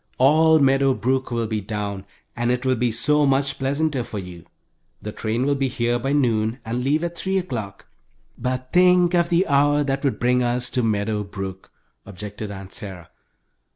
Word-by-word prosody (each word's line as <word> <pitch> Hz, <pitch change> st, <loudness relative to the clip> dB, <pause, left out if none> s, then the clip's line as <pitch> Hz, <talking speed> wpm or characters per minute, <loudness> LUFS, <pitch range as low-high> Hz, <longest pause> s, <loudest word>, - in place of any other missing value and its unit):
All 160 Hz, +4 st, +5 dB
Meadow 135 Hz, -2 st, +3 dB
Brook 130 Hz, +2 st, -1 dB
will 115 Hz, -1 st, -1 dB
be 110 Hz, -1 st, -2 dB
down, 100 Hz, -1 st, -4 dB, 0.3 s
and 120 Hz, 0 st, -1 dB
it 125 Hz, +1 st, -1 dB
will 130 Hz, -, +3 dB
be 120 Hz, 0 st, 0 dB
so 150 Hz, +6 st, +2 dB
much 135 Hz, 0 st, +1 dB
pleasanter 140 Hz, 0 st, 0 dB
for 110 Hz, -, -7 dB
you. 90 Hz, -3 st, -8 dB, 0.5 s
The 105 Hz, -, -6 dB
train 115 Hz, +4 st, -2 dB
will 145 Hz, -, +2 dB
be 135 Hz, -1 st, 0 dB
here 120 Hz, -1 st, -1 dB
by 135 Hz, +3 st, -2 dB
noon 115 Hz, -5 st, +1 dB
and 120 Hz, +2 st, -2 dB
leave 150 Hz, +5 st, +1 dB
at 170 Hz, 0 st, -3 dB
three 190 Hz, +2 st, -1 dB
o'clock." 115 Hz, -, -5 dB, 0.5 s
"But 130 Hz, +1 st, -4 dB
think 180 Hz, -1 st, +5 dB
of 170 Hz, -1 st, +2 dB
the 175 Hz, +2 st, +3 dB
hour 145 Hz, 0 st, +3 dB
that 135 Hz, 0 st, -2 dB
would 140 Hz, -, 0 dB
bring 125 Hz, +1 st, +2 dB
us 125 Hz, 0 st, 0 dB
to 125 Hz, -, 0 dB
Meadow 105 Hz, -1 st, 0 dB
Brook!" 95 Hz, -1 st, -7 dB, 0.3 s
objected 105 Hz, +2 st, -8 dB
Aunt 95 Hz, -1 st, -9 dB
Sarah. 95 Hz, -5 st, -8 dB
125 Hz, 185 wpm, -22 LUFS, 110-140 Hz, 0.5 s, All